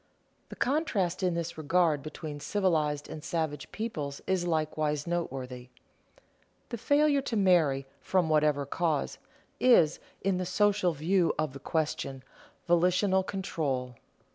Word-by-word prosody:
The - - -8
contrast 220 - 0
in 180 -2 +1
this 170 -1 -4
regard 160 -1 +2
between 155 0 -7
civilized 155 -5 0
and 155 - -8
savage 155 -4 -3
peoples 150 -11 -4
is 185 -2 0
likewise 155 -2 0
noteworthy. 130 -7 -4 1.0
The 235 - -5
failure 285 +3 +3
to 240 -4 -2
marry, 165 -9 +3
from 185 -3 +1
whatever 150 -2 +2
cause, 155 0 -1 0.4
is, 170 -11 +5 0.2
in 190 -1 +1
the 185 - -2
social 200 -1 +2
view 170 +4 +1
of 155 -3 -1
the 140 - -8
question, 140 -4 -2 0.4
volitional 180 +3 +3
control. 150 -10 -3
165 Hz, 125 wpm, -29 LUFS, 150-190 Hz, 1.0 s, is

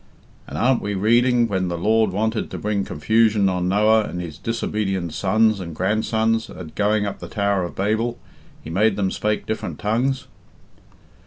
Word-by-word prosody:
And - - -6
aren't 130 0 +2
we 105 0 -3
reading, 120 +4 +3
when 95 -3 -1
the 85 -1 -3
Lord 110 +4 +2
wanted 110 +3 -1
to - - -6
bring 105 -1 -1
confusion 105 +6 +2
on 90 -1 -1
Noah 105 +2 +4
and 90 - -5
his 80 -3 -7
disobedient 95 -6 -2
sons 110 +3 +2
and 85 -4 -7
grandsons 110 +4 0
at 80 -4 -9
going 105 0 +1
up 100 - -4
the - - -7
Tower 100 -3 0
of 85 - -8
Babel, 110 +4 0 0.5
he 80 - -7
made 105 +4 +2
them 95 -2 0
spake 105 0 -1
different 110 - -4
tongues?" 125 +6 0
105 Hz, 170 wpm, -22 LUFS, 95-110 Hz, 0.5 s, Noah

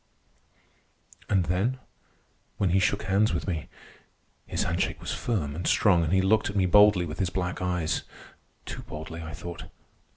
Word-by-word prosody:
And 95 -3 +2
then, 95 +10 0 0.8
when 95 -4 +1
he 95 - +4
shook 95 - +1
hands 100 0 +2
with 85 - -3
me! 80 -5 -3 0.8
His - - -1
handshake - - -1
was - - -4
firm 80 -12 -2
and 85 +1 -3
strong, 90 -5 +4
but 80 -1 -1
he 95 0 +3
looked 110 +3 +3
at 105 - -6
me 95 -2 +3
boldly 100 -1 +6
with 80 0 -7
his 95 -3 +1
black 90 -1 -3
eyes—too 90 -3 -5
boldly, 80 +2 -7
I 80 -2 -7
thought. 85 +1 -7
90 Hz, 160 wpm, -27 LUFS, 85-100 Hz, 0.8 s, boldly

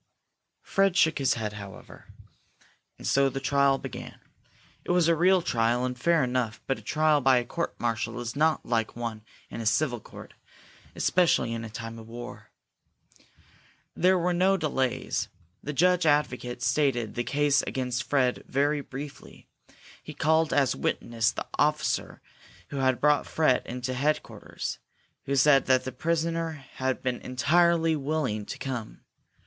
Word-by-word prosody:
Fred 195 -1 +2
shook 160 -4 +3
his 135 -2 +2
head, 110 -3 -4
however. 100 -2 -11 0.9
And - - -11
so 140 0 +3
the 135 - -4
trial 140 0 +2
began. - - -8 0.6
It - - -12
was 175 -2 +3
a 170 - +4
real 180 +2 +4
trial, 120 0 +1
and 125 0 -3
fair 165 +4 +2
enough, 125 -3 -1
but 135 - -1
a - - -14
trial 155 -1 +2
by 130 -2 +4
court 170 +7 -4
martial 115 +1 -2
is 120 +1 -5
not 155 +2 +1
like 115 -2 -1
one 115 -2 -5 0.3
in - - -5
a - - -5
civil 125 0 +1
court, - - -12 0.6
especially 170 -10 +2
in 115 -1 -5
time 115 +1 -7
of 110 - -12
war. 120 +1 -9 1.5
There 185 +2 +4
were 180 0 +1
no 190 +2 +3
delays. 135 -7 -1 0.3
The 150 - -4
judge 180 +3 +3
advocate 125 -5 0
stated 125 -8 +1
the 120 - -2
case 145 +2 +2
against 125 -2 -2
Fred 130 -2 0
very 145 +2 +1
briefly. 140 +2 -9 0.6
He - - -10
called 160 +1 +2
as 140 -3 +2
witness 115 -1 0
the - - -5
officer 150 0 0 0.5
who 140 - -5
had 130 -2 +1
brought 150 0 +3
Fred 155 -6 +2
into 125 +1 -4
headquarters, 145 +4 -3 0.5
who 140 - -1
said 135 0 +5
that 130 -1 +3
the 130 - -5
prisoner 165 +3 -1 0.2
had 130 0 -1
been 125 -1 -2
entirely 165 +5 +2
willing 135 -8 -2
to - - -6
come. 125 -5 -5
135 Hz, 150 wpm, -27 LUFS, 120-155 Hz, 1.5 s, said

